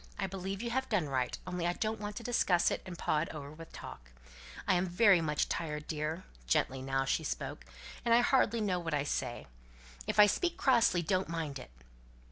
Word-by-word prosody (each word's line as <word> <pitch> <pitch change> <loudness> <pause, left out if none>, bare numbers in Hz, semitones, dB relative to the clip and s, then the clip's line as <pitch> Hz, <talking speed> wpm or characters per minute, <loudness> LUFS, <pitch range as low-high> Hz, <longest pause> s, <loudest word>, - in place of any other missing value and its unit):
I 200 - -1
believe 195 +2 -4
you 235 - -2
have 265 +2 -1
done 190 -9 +1
right. 130 -2 -1
Only 180 -1 -2
I 175 - +1
don't 220 +3 -2
want 205 0 -5
to 235 - -6
discuss 195 -7 +2
it, - - -2
and 175 -2 -7
paw 150 - +1
it 160 - -2
over 145 -2 -7
with 165 +1 -11
talk. - - -10 0.6
I'm 185 0 +3
very 185 0 +5
much 150 -2 0
tired, 150 -2 -3
dear" 155 +3 -3 0.2
gently 130 - +1
now 135 0 0
she - - 0
spoke - - -4 0.4
"and 235 - 0
I 235 +1 +7
hardly 235 -3 +3
know 185 -4 0
what 165 -3 -2
I 145 - +1
say. 125 -4 -3 0.6
If - - -1
I 210 - +10
speak 345 - 0
crossly, 230 -9 +3
don't 185 +1 0
mind 160 -5 -3
it." - - -10
175 Hz, 205 wpm, -32 LUFS, 150-210 Hz, 0.6 s, I